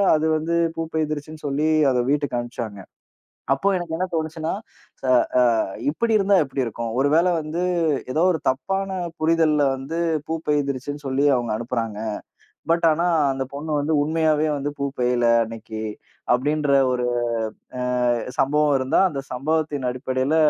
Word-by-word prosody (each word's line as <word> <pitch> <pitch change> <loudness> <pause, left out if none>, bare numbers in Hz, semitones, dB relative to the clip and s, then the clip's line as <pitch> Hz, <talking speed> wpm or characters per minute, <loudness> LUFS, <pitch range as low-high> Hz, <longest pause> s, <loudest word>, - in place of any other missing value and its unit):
அது 155 - 0
வந்து 165 +2 -1 0.2
பூப்பெயிய்துர்ச்சுன்னு 155 -1 -3
சொல்லி 145 +3 0 0.2
அத 125 - +1
வீட்டுக்கு 145 -3 0
அனுப்புச்சாங்க. 115 -4 -6 0.7
அப்ப 135 +9 +1
எனக்கு 170 -2 -4
என்ன 185 +2 -1
தோணுச்சுன்னா 160 0 -2 0.5
ச - - -13 0.5
அ, - - +3 0.3
இப்டி 225 +9 0
இருந்தா 200 0 +3
எப்டி 135 -1 -3
இருக்கும்? 115 0 -4
ஒருவேள 150 +5 +3
வந்து 155 +2 -4 0.5
ஏதோ 155 - +1
ஒரு 160 - -1
தப்பான 195 +9 -2 0.3
புரிதல்ல 160 -1 +3 0.2
வந்து 135 +5 -5 0.3
பூப்பயிர்த்துச்சுன்னு 145 -3 -2
சொல்லி 135 +2 +1
அவங்க 120 -3 -1
அனுப்புறாங்க. 115 -2 -3 0.8
பட் 170 0 +2
ஆனா 170 +3 0 0.3
அந்தப் 135 0 -5
பொண்ணு 155 +2 -5
வந்து 150 +3 -1
உண்மையாவே 155 0 +1
வந்து 145 +1 -3
பூப்பெயிய்யல 125 -3 +1 0.2
அன்னைக்கு, 110 -1 -7 0.5
அப்டின்ற 145 +3 +1 0.2
ஒரு 125 -1 0 0.7
அ - - -1 0.6
சம்பவம் 145 +2 +3
இருந்தா, 130 +4 +2
அந்தச் 135 -5 -7
சம்பவத்தின் 145 -1 -1
அடிப்படையில 130 +3 -1
145 Hz, 130 wpm, -23 LUFS, 130-160 Hz, 0.8 s, அ